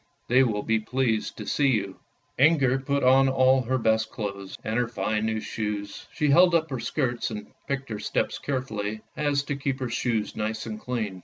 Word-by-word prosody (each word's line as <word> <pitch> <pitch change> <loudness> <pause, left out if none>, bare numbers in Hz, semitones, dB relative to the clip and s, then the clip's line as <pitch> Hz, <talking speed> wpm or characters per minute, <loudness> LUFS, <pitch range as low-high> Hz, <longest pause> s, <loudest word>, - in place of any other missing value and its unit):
They 125 +2 +6
will 110 -5 +1
be 115 0 +1
pleased 115 -1 -1
to - - -6
see 145 - +2
you." 100 -7 0 0.4
Inger 135 -3 +4
put 140 +1 -1
on 135 +1 +5
all 130 0 +4
her 130 +1 0
best 110 -2 +1
clothes, 100 -3 -6
and 110 +2 -1
her 120 - +1
fine 110 0 -1
new 110 0 -1
shoes; 105 -2 -4
she 150 - 0
held 175 +3 +6
up 160 -2 +1
her 130 - -2
skirts 120 0 -1
and 105 -2 -6 0.2
picked 135 -1 -3
her 105 -2 -4
steps - - -1
carefully 110 -6 -3
so 110 - -15 0.2
as 145 -1 +1
to 140 0 -3
keep 140 -1 -2
her 130 -2 -3
shoes 115 -4 -1
nice 110 +1 -3
and 110 -2 -5
clean. 110 -6 -3
120 Hz, 205 wpm, -26 LUFS, 110-135 Hz, 0.4 s, They